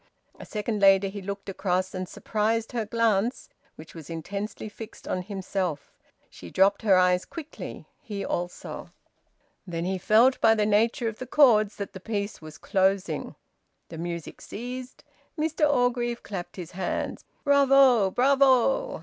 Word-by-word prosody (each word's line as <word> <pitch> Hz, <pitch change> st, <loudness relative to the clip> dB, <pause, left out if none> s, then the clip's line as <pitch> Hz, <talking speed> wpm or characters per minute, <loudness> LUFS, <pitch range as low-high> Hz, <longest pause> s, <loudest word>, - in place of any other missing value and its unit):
A -, -, -10 dB
second 210 Hz, 0 st, -3 dB
later, 195 Hz, 0 st, +5 dB
he 200 Hz, +1 st, -7 dB
looked 200 Hz, +1 st, -6 dB
across, 185 Hz, -1 st, -1 dB
and 185 Hz, -1 st, -4 dB
surprised 225 Hz, +1 st, -1 dB
her 230 Hz, -3 st, -2 dB
glance, 230 Hz, +1 st, 0 dB, 0.3 s
which 155 Hz, -, -12 dB
was 160 Hz, -3 st, -11 dB
intensely 200 Hz, +7 st, -5 dB
fixed 215 Hz, +1 st, -11 dB
on 185 Hz, -, -1 dB
himself. 185 Hz, -5 st, -4 dB, 0.3 s
She 85 Hz, -, -12 dB
dropped 195 Hz, -, +3 dB
her 205 Hz, -4 st, +4 dB
eyes 180 Hz, 0 st, +3 dB
quickly; 315 Hz, -2 st, -9 dB, 0.2 s
he 205 Hz, -8 st, -5 dB
also. 175 Hz, 0 st, -5 dB, 0.8 s
Then 170 Hz, -1 st, -3 dB
he 190 Hz, 0 st, -1 dB
felt 230 Hz, +7 st, +4 dB
by 225 Hz, 0 st, +6 dB
the 210 Hz, -1 st, +1 dB
nature 225 Hz, +3 st, +2 dB
of 220 Hz, -1 st, -5 dB
the 255 Hz, -, -6 dB
chords 220 Hz, -7 st, +4 dB
that 200 Hz, -, -6 dB
the 190 Hz, -, -8 dB
piece 205 Hz, -1 st, -4 dB
was 155 Hz, -1 st, -11 dB
closing. 190 Hz, 0 st, 0 dB, 0.5 s
The 165 Hz, -, -8 dB
music 170 Hz, -1 st, -6 dB
ceased. 250 Hz, +3 st, -7 dB, 0.3 s
Mr 310 Hz, -1 st, +1 dB
Orgreave 245 Hz, -2 st, 0 dB
clapped 190 Hz, -4 st, -6 dB
his 175 Hz, -3 st, -8 dB
hands. 185 Hz, 0 st, -3 dB, 0.2 s
"Bravo! 275 Hz, -6 st, +5 dB
Bravo!" 275 Hz, -, +3 dB
210 Hz, 150 wpm, -26 LUFS, 185-240 Hz, 0.8 s, by